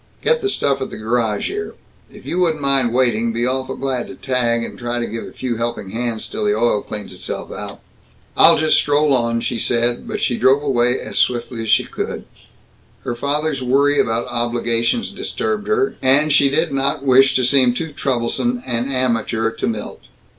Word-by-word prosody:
Get 475 0 +2
the 400 - 0
stuff 140 - 0
at 130 - -4
a - - -7
garage 110 -1 -1
here. 415 +2 -5 0.4
If - - -14
you 180 - -2
wouldn't 165 -4 +1
mind 135 -4 +2
waiting, 120 -2 +1
be 115 +1 -1
awful 130 +1 -2
glad 130 -3 -2
to - - -9
tag, 120 -3 0
and - - -7
try 120 0 -4
to 120 - -1
give 115 0 -5
a - - -10
few 120 -3 -4
helping 115 -4 -4
hands 115 0 -3
till - - -5
the 105 0 +2
oil 115 -2 +2
cleans 105 -3 -7
itself 90 - -6
out." - - -7 0.5
"I'll - - +7
just 155 0 +3
stroll 145 0 +2
on," 115 -2 +1
she 120 -1 -2
said, 120 +1 0
but - - -3
she 120 - 0
drove 135 +2 +4
away 125 -3 +1
as - - -3
swiftly 120 -1 0
as 110 - -4
she - - +4
could. - - -5 0.8
Her - - -3
father's 145 +3 -1
worry 140 +3 +2
about 115 +1 +1
obligations 120 - 0
disturbed 215 +1 -3
her, 425 -2 +1
and 140 +3 +3
she 140 -1 +5
did 160 +4 0
not 135 0 0
wish 135 +1 +5
to 130 - +2
seem 125 -1 +4
too 160 +3 -4
troublesome 145 - -1
an 120 +2 -2
amateur 115 -3 0
to 115 - -3
Milt. 110 -2 -5
125 Hz, 195 wpm, -19 LUFS, 115-140 Hz, 0.8 s, I'll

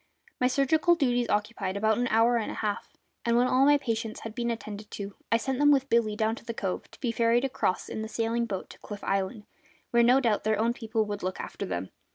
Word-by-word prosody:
My 250 - +3
surgical 310 +6 +3
duties 245 -6 +1
occupied 210 -2 -1
about 220 +2 +2
an 245 - +1
hour 230 +1 +4
and 225 - -2
a - - -5
half; 210 -1 -3 0.3
and 235 0 +2
when 245 - +4
all 255 +2 +4
my 290 0 +6
patients 225 -5 -3
had 225 - -7
been 235 0 -2
attended 215 -2 -5
to 200 -1 -6 0.2
I 230 - +5
sent 265 +2 -2
them 290 0 +5
with 275 -1 +3
Billy 225 -2 +3
down 220 0 +1
to - - -12
the 230 -1 -5
cove, 190 -4 -3
to - - -17
be 240 - -1
ferried 235 +2 +2
across 250 -8 -1
in 220 - -4
the 220 - -4
sailing 230 +1 -1
boat 195 -4 -5
to - - -14
Cliff 205 -1 -8
Island, 195 +3 -1 0.5
where 235 - +5
no 245 +3 +6
doubt 230 -6 +1
their 215 0 +1
own 230 +2 +2
people 225 -2 -1
would 205 -1 -4
look 185 0 -3
after - - -5
them. 90 +1 -4
230 Hz, 240 wpm, -28 LUFS, 210-245 Hz, 0.5 s, my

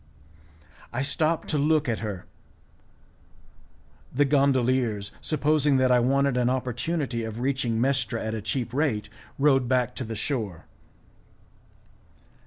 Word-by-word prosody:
I 130 +2 -2
stopped 155 +3 0
to 150 - +1
look 155 0 +2
at 115 -3 -1
her; 100 -5 -5 1.9
the 145 +3 +2
gondoliers, 130 -6 +1
supposing 150 -2 +2
that 130 -1 +3
I 125 - +5
wanted 135 +1 +2
an 125 0 +2
opportunity 130 +1 -2
of 110 0 -5
reaching 125 -3 0
Mestra 130 -2 0
at 110 - -2
a 110 - -3
cheap 120 +2 -3
rate, 120 -8 0 0.3
rowed 135 -3 +3
back 125 -1 +1
to - - -2
the 115 -1 -5
shore. 110 - -3
130 Hz, 125 wpm, -26 LUFS, 115-140 Hz, 1.9 s, I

